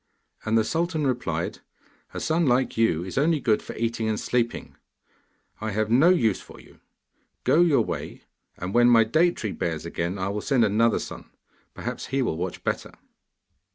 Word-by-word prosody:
And 110 +1 +2
the 110 - +4
sultan 165 +4 -1
replied, 90 -11 -2 0.5
'A - - -6
son 160 0 +1
like 125 +1 +2
you 100 -8 +2
is 95 +7 -3
only 155 +2 +2
good 110 -6 +1
for - - -9
eating 115 -1 -1
and 110 - -1
sleeping. 120 -1 -2 0.8
I 110 - -3
have 110 +1 -1
no 135 +9 +6
use 115 - +2
for - - -14
you. - - -18 0.6
Go 165 - +4
your 165 -5 +4
way, - - -5 0.3
and 90 +2 -5
when 120 0 +5
my 115 -2 +6
date 160 +10 +2
tree 110 - -4
bears 80 -3 -3
again, 85 +3 -3
I 95 0 -2
will 105 +1 -3
send 130 -3 +2
another 110 +2 +2
son; - - -7 0.5
perhaps - - -5
he 135 0 0
will 100 - -1
watch 90 +1 -5
better. - - -3
115 Hz, 180 wpm, -25 LUFS, 100-135 Hz, 0.8 s, no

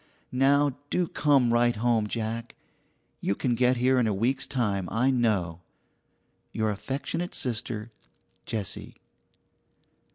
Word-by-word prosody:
Now 140 +1 +3
do 180 -1 +1
come 135 -7 +3
right 120 0 +3
home, 115 -1 +1
Jack. 115 +1 -4 0.6
You 100 - 0
can 125 +3 0
get 125 +1 +3
here 130 +1 +3
in 120 - +2
a 105 - +1
week's 120 +7 0
time, 100 -8 -1
I 125 +4 +2
know. 100 -9 0 0.9
Your 110 -1 0
affectionate 140 - -4
sister, 115 -2 -2 0.6
JESSIE. 105 -5 -4
120 Hz, 120 wpm, -27 LUFS, 110-130 Hz, 0.9 s, Now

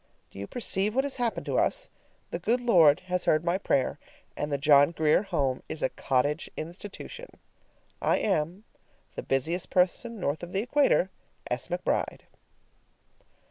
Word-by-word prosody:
Do - - -11
you 100 - -5
perceive 210 -3 0
what 265 - +3
has 280 -1 -3
happened 240 -2 -2
to - - +1
us? - - 0 0.4
The - - -3
good 240 +3 +1
Lord 175 -11 +5
has 180 -1 -2
heard 155 +2 +2
my 175 +2 +1
prayer, 135 -8 0 0.4
and 150 - -3
the 140 - +1
John 145 0 +6
Grier 160 0 +2
Home 145 -10 -1
is 160 - -5
a 130 - +2
cottage 145 +4 -1
institution! 205 - -8 0.7
I - - +2
am, 180 0 -1 0.5
The - - -5
busiest 160 +7 -1
person 220 +6 +1
north 145 -3 -1
of 175 +1 -8
the 195 - +1
equator, 250 -8 +2 0.4
S. 125 - -2
McBRIDE. 175 +1 -2
175 Hz, 155 wpm, -28 LUFS, 150-210 Hz, 0.7 s, John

